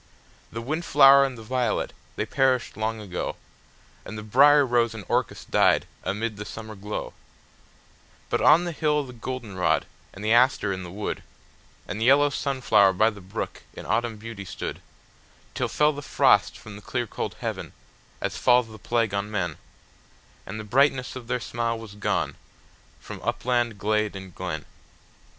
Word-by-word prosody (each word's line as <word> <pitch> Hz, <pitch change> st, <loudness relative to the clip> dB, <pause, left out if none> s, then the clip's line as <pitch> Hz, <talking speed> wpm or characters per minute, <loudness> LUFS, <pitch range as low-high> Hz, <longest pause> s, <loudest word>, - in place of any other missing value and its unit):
The 115 Hz, +1 st, -5 dB
wind 155 Hz, +7 st, -2 dB
flower 140 Hz, -3 st, +7 dB
and 130 Hz, -2 st, -4 dB
the 115 Hz, -, -10 dB
violet, 125 Hz, -1 st, -1 dB, 0.2 s
they -, -, -1 dB
perished 130 Hz, -2 st, +1 dB
long 110 Hz, +1 st, -2 dB
ago, 95 Hz, -4 st, -4 dB, 0.7 s
And 110 Hz, -, -8 dB
the 105 Hz, -, -6 dB
brier 140 Hz, +6 st, +6 dB
rose 120 Hz, -2 st, +1 dB
and 110 Hz, -, -7 dB
the -, -, -20 dB
orchis -, -, -1 dB
died -, -, +3 dB, 0.2 s
amid 110 Hz, +1 st, -2 dB
the 105 Hz, -, -5 dB
summer 110 Hz, +1 st, -8 dB
glow; 105 Hz, +1 st, -5 dB, 1.1 s
But -, -, 0 dB
on 160 Hz, +4 st, +6 dB
the 175 Hz, -, -3 dB
hill 150 Hz, -2 st, +1 dB
the 125 Hz, -2 st, -10 dB
goldenrod, 115 Hz, -8 st, -1 dB, 0.3 s
and 100 Hz, +2 st, -9 dB
the 110 Hz, -, +3 dB
aster 120 Hz, -4 st, +4 dB
in 95 Hz, -, -5 dB
the 90 Hz, -, -7 dB
wood, 100 Hz, +4 st, -4 dB, 0.7 s
And 110 Hz, -, -4 dB
the -, -, +2 dB
yellow 145 Hz, +2 st, +5 dB
sunflower 130 Hz, -9 st, +3 dB
by 110 Hz, +4 st, +3 dB
the 105 Hz, -2 st, -12 dB
brook 95 Hz, +2 st, -5 dB
in -, -, -8 dB
autumn 115 Hz, -2 st, 0 dB
beauty 110 Hz, -1 st, -8 dB
stood, 95 Hz, -, -6 dB, 0.7 s
Till -, -, -1 dB
fell 150 Hz, 0 st, +3 dB
the 145 Hz, -, -6 dB
frost 145 Hz, -, +3 dB
from 105 Hz, -2 st, -11 dB
the 105 Hz, -, -10 dB
clear 120 Hz, +2 st, -2 dB
cold -, -, -5 dB
heaven, -, -, -4 dB, 0.5 s
as -, -, -2 dB
falls 125 Hz, -2 st, +4 dB
the 110 Hz, 0 st, -11 dB
plague 115 Hz, -1 st, 0 dB
on 100 Hz, +1 st, -1 dB
men, 90 Hz, -7 st, -2 dB, 0.9 s
And 110 Hz, -, -5 dB
the -, -, -5 dB
brightness 130 Hz, +3 st, +2 dB
of 125 Hz, -3 st, -8 dB
their 125 Hz, 0 st, -1 dB
smile 115 Hz, 0 st, -2 dB
was 115 Hz, -2 st, -10 dB
gone, 105 Hz, -, -1 dB, 0.6 s
from -, -, -9 dB
upland, 120 Hz, -3 st, 0 dB
glade, 105 Hz, 0 st, 0 dB
and 95 Hz, -2 st, -9 dB
glen. -, -, -5 dB
115 Hz, 175 wpm, -25 LUFS, 105-130 Hz, 1.1 s, flower